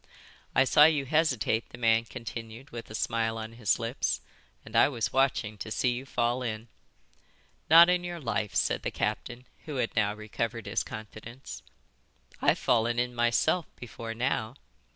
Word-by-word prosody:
"I 135 - +6
saw 150 +3 +6
you 150 -3 +3
hesitate," 130 -7 +1
the - - -11
man 115 -1 +3
continued, 115 +1 -8
with 115 -1 -8
a 110 - -7
smile 115 0 -1
on 110 0 -6
his 115 -3 +1
lips, 115 +2 -1 0.5
"and - - -10
I - - +6
was 120 -7 -2
watching 115 -6 +1
to 110 - -5
see 125 +3 +1
you 125 +3 -5
fall 120 0 0
in." 115 -1 -4 1.0
"Not 165 +2 +9
on 180 0 +2
your 175 -1 -5
life," 110 -6 -2
said - - +1
the - - -2
captain, 125 +1 -3 0.2
who 150 - -5
had 125 -3 -1
now 105 -2 +1
recovered 115 +2 -4
his - - -1
confidence. 110 +4 -9 0.8
"I've - - +3
fallen 120 0 +1
in 125 0 0
myself 120 +8 +1
before 115 -1 -7
now. 120 -1 -1
120 Hz, 165 wpm, -29 LUFS, 110-130 Hz, 1.0 s, Not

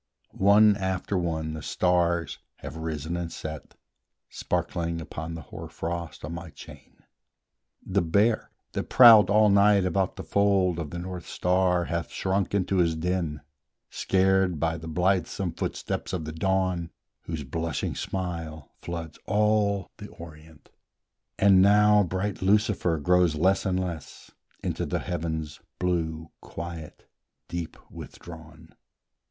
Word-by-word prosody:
One 105 +2 +5
after 95 0 -2
one 80 -3 -2
the 80 - -6
stars 85 0 0 0.2
have - - -9
risen 80 0 -4
and 85 -1 -4
set, 80 -1 -8 0.6
Sparkling 85 -1 -2
upon 80 0 -6
the 80 - -8
hoarfrost 85 +4 -6
on - - -6
my 85 -1 -7
chain: 70 - -14 0.8
The 95 +1 +1
Bear, 100 +7 +2 0.2
that - - -4
prowled 115 -5 +8
all 105 +1 +5
night 100 -1 +5
about 90 +1 0
the - - -7
fold 95 -4 +2
Of 80 -3 -4
the 85 - -6
North 90 -1 -6
star, 90 -1 +1
hath 85 +1 -3
shrunk 95 +1 -1
into 95 0 0
his 85 -2 +2
den, 85 -3 -2 0.5
Scared 95 -3 +2
by 80 0 0
the 80 0 -8
blithesome 90 +2 0
footsteps - - -4
of 85 -4 -2
the 80 - -5
Dawn, 90 -1 0 0.4
Whose 80 -3 -4
blushing 80 +2 -3
smile 85 -6 -5
floods 85 -2 -6
all 105 -1 +1
the 105 - -9
Orient; 80 -3 -14 0.7
And 95 -2 +6
now 105 +1 +6
bright 95 +2 -2
Lucifer 100 -3 +2
grows 90 +1 +3
less 95 +6 +2
and 90 -1 0
less, 85 -5 -6 0.3
Into - - -2
the - - -1
heaven's 80 -3 -4 0.2
blue 80 -3 -2
quiet 85 -2 -8 0.4
deep 85 -1 -5
withdrawn. 80 -1 -12
85 Hz, 130 wpm, -26 LUFS, 80-95 Hz, 0.8 s, prowled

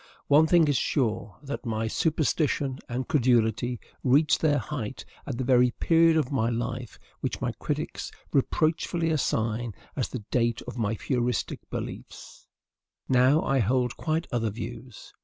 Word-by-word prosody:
One 150 +3 +6
thing 170 -2 +5
is 145 -3 +2
sure, 110 -8 -1
that 140 0 -5
my 110 -2 -2
superstition 145 -1 0
and 125 +2 -3
credulity 120 -4 +2 0.2
reached 140 +3 +4
their 150 -2 +3
height 130 -5 -5 0.2
at - - -3
the 130 - -1
very 125 -1 +4
period 165 -1 +4
of 150 -4 0
my 120 -4 +1
life 120 0 -4 0.2
which - - -3
my - - -1
critics - - -3 0.2
reproachfully 165 +3 +1
assign 115 -6 -1 0.2
as 130 - -1
the 125 -5 -6
date 120 -2 +1
of - - -8
my 110 -2 -1
Fourieristic 125 -1 -1
beliefs. - - -8 0.6
Now 130 +4 +4
I 135 0 +1
hold 125 +2 +1
quite 160 +1 -1
other 115 -2 0
views. 115 +2 -8
125 Hz, 145 wpm, -27 LUFS, 115-145 Hz, 0.6 s, One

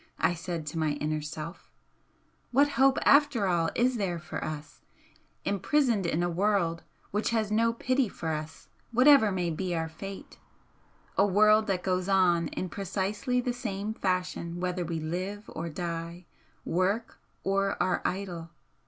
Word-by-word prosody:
I - - +2
said 170 -1 -4
to 150 +2 -4
my 155 -2 +1
inner 150 +1 -2
self, 155 +3 -7 0.8
what 280 +4 +4
hope 270 -1 +4
after 285 -7 +5
all 170 -3 +2
is 245 +1 +2
there 185 -5 -1
for 170 - -6
us, 155 -1 -6 0.6
imprisoned 215 - +1
in 170 +1 0
a - - +2
world 175 -2 +1 0.3
which 210 +2 0
has 220 -3 0
no 230 +2 +3
pity 255 +1 0
for 165 - -5
us 155 0 -5 0.2
whatever 250 -2 +6
may 180 -2 -1
be 180 +2 -2
our 160 0 -2
fate, 195 +5 -9 0.8
a 200 - +6
world 215 +2 +5
that 185 -3 -1
goes 185 0 0
on 175 -4 +3
in 185 - -4
precisely 200 +7 -1
the 245 0 -1
same 215 -4 -3
fashion 180 -3 -2
whether 180 0 -1
we 165 -1 -3
live 185 +6 -4
or 165 +1 -4
die, 170 +1 -5 0.4
work 195 +6 0 0.2
or 195 0 +1
are 185 - +1
idle? 180 -3 -3
185 Hz, 155 wpm, -29 LUFS, 170-215 Hz, 0.8 s, whatever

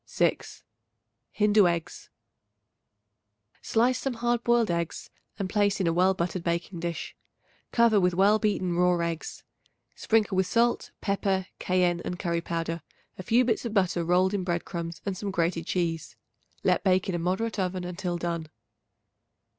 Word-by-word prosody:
6. - - -1 0.7
Hindu 210 -2 +4
Eggs. 170 -1 -3 1.5
Slice 245 +3 +2
some 270 -3 -2
hard 240 0 0
boiled 235 -4 +3
eggs 170 -1 -3 0.3
and 200 -2 -2
place 205 0 +1
in 190 - +1
a 165 - +2
well 185 +2 +3
buttered 170 0 -2
baking 170 +1 -2
dish. 170 -1 -4 0.6
Cover 230 -3 +4
with 180 -2 +2
well 205 +3 +4
beaten 185 -5 0
raw 180 0 +3
eggs; 170 -1 -4 0.5
sprinkle 215 -3 +1
with 190 -1 +2
salt, 235 +4 +1
pepper, 195 -2 0
cayenne 180 -1 +1
and 180 - -4
curry 170 -2 -1
powder, 165 0 -3 0.4
a - - -2
few 235 +7 +3
bits 230 -2 0
of 230 -2 -4
butter 180 -3 +2
rolled 180 +3 +2
in 200 -2 -1
bread 175 -1 -2
crumbs 170 -3 -5
and 200 -2 -2
some 200 +2 -4
grated 170 -2 -1
cheese. 165 -3 -2 0.5
Let - - +2
bake 185 -1 +2
in 190 - -1
a 175 - -1
moderate 190 +6 -1
oven 185 -1 -1
until 180 0 -3
done. 170 -2 -3
185 Hz, 155 wpm, -27 LUFS, 170-205 Hz, 1.5 s, Hindu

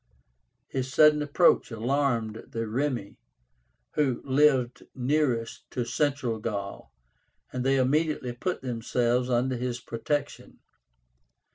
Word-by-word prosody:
His 130 -1 -3
sudden 150 0 +6
approach 150 +4 +3
alarmed 115 -2 -1
the 115 -1 -3
Remi, 120 -2 -2 0.7
who 135 -5 +1
lived 135 -3 +3
nearest 125 -3 -1
to 125 -2 -2
Central 125 -2 -1
Gaul, 100 -3 -5 0.6
and 125 -1 -2
they 135 +1 +3
immediately 135 -1 +1
put 175 +8 -3
themselves 125 0 0
under 125 +1 +1
his 120 0 -3
protection. 135 +5 -4
125 Hz, 105 wpm, -27 LUFS, 120-145 Hz, 0.7 s, sudden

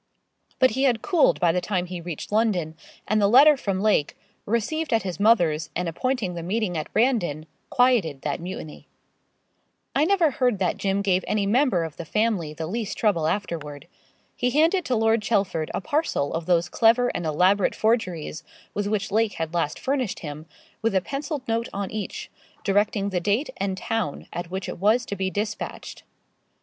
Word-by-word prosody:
But 260 -2 +4
he 265 +5 +1
had 240 -4 +1
cooled 350 -6 +3
by 175 -2 +4
the 180 +2 0
time 180 -1 -1
he 180 -1 -6
reached 170 +1 -6
London, 200 -8 +1 0.3
and 215 0 +2
the 200 - +5
letter 280 +7 +7
from 195 -8 -2
Lake, 210 -9 +1 0.3
received 240 +9 -1
at 225 -1 +2
his 185 -1 -5
mother's 170 -8 +3
and 180 0 -1
appointing 215 +2 -1
the 170 - -5
meeting 190 +1 -1
at 155 -2 -4
Brandon, 215 - +1 0.2
quieted 225 - +2
that 145 - -2
mutiny. 170 -3 -8 1.1
I 285 +3 +4
never 350 -4 +3
heard 250 -5 +1
that 185 -2 0
Jim 195 0 0
gave 190 -2 +2
any 210 -2 +1
member 225 - +2
of 160 -2 -7
the 170 - -6
family 210 -5 0
the 160 +1 -5
least 210 +3 -4
trouble 175 -8 +2
afterward. 160 -5 -4 0.5
He 250 - 0
handed 325 +6 +2
to 255 - 0
Lord 225 0 +2
Chelford 195 -8 0
a - - -3
parcel 285 - -1
of 165 0 -3
those 175 -1 +3
clever 235 +5 +3
and 175 - -3
elaborate 180 +5 +2
forgeries, 185 -9 -1 0.3
with 205 0 -2
which 205 -1 -1
Lake 220 0 +2
had 160 0 -4
last 170 -4 -1
furnished 260 -5 -2
him, 150 0 -7 0.3
with 225 -2 0
a 190 - +4
pencilled 275 - -5
note 230 +1 -1
on 200 -1 -3
each, 215 -2 -5 0.3
directing 200 0 +1
the 185 -2 -1
date 205 - 0
and 190 -1 -2
town 210 -8 -3
at 175 -1 -5
which 190 +1 -4
it - - -6
was 220 +5 +3
to 200 - -4
be 190 -1 -1
despatched. 210 +2 -5
200 Hz, 185 wpm, -24 LUFS, 175-230 Hz, 1.1 s, letter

